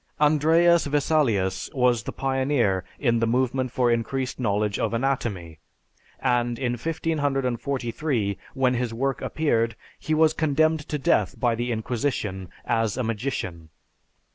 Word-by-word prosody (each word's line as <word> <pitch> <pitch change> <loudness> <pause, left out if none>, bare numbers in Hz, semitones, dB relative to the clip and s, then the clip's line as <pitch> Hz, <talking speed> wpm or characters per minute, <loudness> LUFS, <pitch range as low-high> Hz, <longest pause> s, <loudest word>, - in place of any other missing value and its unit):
Andreas 160 +3 +4
Vesalius 135 -10 +1
was 125 -3 +3
the - - -6
pioneer 130 -8 0
in 120 -4 +1
the 115 - +1
movement 130 +1 0
for 125 -1 +2
increased 125 +3 -2
knowledge 105 -3 0
of - - 0
anatomy, 110 - -2 0.6
and 120 -2 +1
in 125 -2 -1
1543, 135 -5 -1 0.2
when 130 -2 +2
his 120 -2 -2
work 135 +2 -1
appeared, 115 -7 0 0.2
he 155 - -1
was 155 0 +4
condemned 155 +1 +2
to 150 - -1
death 110 -7 +1
by 120 -2 +2
the 120 +2 -2
Inquisition 110 -5 -2 0.2
as 115 0 0
a 130 - 0
magician. 105 - -4
125 Hz, 130 wpm, -25 LUFS, 115-140 Hz, 0.6 s, Andreas